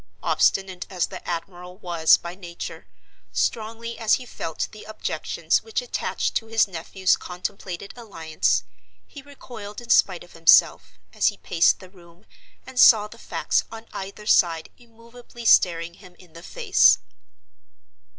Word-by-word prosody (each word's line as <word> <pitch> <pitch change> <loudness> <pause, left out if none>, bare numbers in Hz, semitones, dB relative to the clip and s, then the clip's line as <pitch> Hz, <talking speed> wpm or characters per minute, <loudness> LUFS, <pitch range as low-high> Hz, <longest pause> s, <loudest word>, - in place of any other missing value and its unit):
Obstinate 190 -2 +1
as 180 -3 -1
the - - -10
admiral 180 +1 -6
was 170 -4 +3
by 170 0 -8
nature, 175 -2 -9 0.4
strongly 230 +1 -3
as 220 -1 +3
he 255 - -8
felt 165 -8 -4
the 215 - -12
objections 215 0 -2
which 445 - -3
attached - - -3
to 225 - -2
his 225 -1 +2
nephew's 185 +1 0
contemplated 180 +1 -7
alliance, 165 -10 -1 0.4
he 285 - -12
recoiled 240 -7 -10
in 240 -1 -6
spite 185 -3 +3
of 175 - -18
himself, 165 0 +4 0.2
as - - +2
he - - 0
paced 165 -1 +2
the 185 - -13
room 175 +1 -20 0.4
and 260 -1 -6
saw 215 -3 +7
the 230 +2 -15
facts - - -1
on 225 0 -9
either 200 +2 -8
side 165 -6 +2
immovably 235 0 -14
staring 170 -5 +4
him 180 -1 -17
in 175 -4 -19
the 165 - -11
face. - - +4
195 Hz, 145 wpm, -24 LUFS, 175-225 Hz, 0.4 s, saw